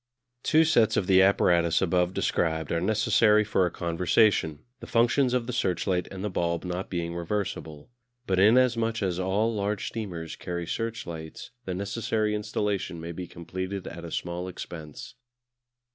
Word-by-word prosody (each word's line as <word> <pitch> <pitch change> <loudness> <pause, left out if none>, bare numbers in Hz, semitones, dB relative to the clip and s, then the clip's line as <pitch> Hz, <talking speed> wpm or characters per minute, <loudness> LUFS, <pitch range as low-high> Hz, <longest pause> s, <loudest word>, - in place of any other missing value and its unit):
Two 160 +2 +4
sets 120 -9 +3
of 95 - +1
the 95 0 +5
apparatus 85 -3 +4
above 90 -1 +1
described 80 -4 -1
are 85 - 0
necessary 110 0 +4
for 95 -3 +1
a - - -2
conversation, 85 -2 +1 0.2
the - - -9
functions 120 +3 +3
of 125 -2 0
the 125 - -4
searchlight 90 -4 0
and 95 0 -7
the 105 - -1
bulb 85 -1 -1
not 90 +1 -4
being 85 -2 -3
reversible. 85 -3 -4 0.3
But 95 -4 +1
inasmuch 115 0 +3
as 90 -2 -1
all 100 +5 +1
large 100 -1 -2
steamers 90 -8 -5
carry 85 -1 -4
searchlights 85 -4 -5
the 95 - -3
necessary 105 +2 -1
installation 105 -4 -2
may 85 +1 -6
be 90 +1 -6
completed 95 +3 -5
at 85 0 -8
a 85 - -6
small 85 +2 -4
expense. 80 -4 -8
95 Hz, 155 wpm, -27 LUFS, 85-110 Hz, 0.3 s, the